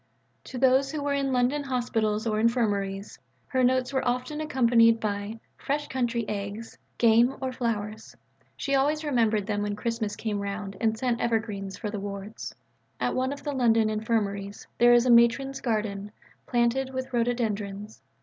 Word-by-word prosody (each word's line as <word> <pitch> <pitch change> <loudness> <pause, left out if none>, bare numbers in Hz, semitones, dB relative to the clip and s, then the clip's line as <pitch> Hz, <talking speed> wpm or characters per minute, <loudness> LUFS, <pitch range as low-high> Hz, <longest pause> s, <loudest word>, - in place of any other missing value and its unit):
To 260 - -7
those 265 +1 +3
who 305 -2 -3
were 285 0 0
in 275 -1 0
London 255 +3 +2
hospitals 225 -4 -1
or 215 -2 0
infirmaries, 205 -4 0 0.3
her 260 -2 0
notes 255 +1 +2
were 265 - +1
often 255 +5 -2
accompanied 235 -5 +4
by 210 0 -3 0.2
"fresh 290 +1 -2
country 240 -3 -1
eggs," 205 +2 -5 0.2
game, 235 +3 +4
or 260 -1 -2
flowers. 220 -3 -4 0.4
She 275 - -2
always 295 +3 +2
remembered 225 -8 +1
them 205 -1 -1
when 205 0 -2
Christmas 220 -1 -2
came 210 -2 -3
round 200 0 -4
and 220 -1 +1
sent 245 0 -1
evergreens 215 -4 -2
for 210 - -4
the 210 - -4
wards. 200 +1 -7 0.4
At - - 0
one 260 +1 0
or - - -3
two 285 - -13
of - - -20
the 290 - -2
London 225 -4 +3
Infirmaries 205 -2 -2
there 240 0 +7
is 240 +1 +4
a 250 - +4
Matron's 250 +3 +4
Garden, 210 -3 -2 0.4
planted 245 +2 +1
with 260 0 -4
rhododendrons. 215 -4 -2
230 Hz, 170 wpm, -27 LUFS, 210-255 Hz, 0.4 s, there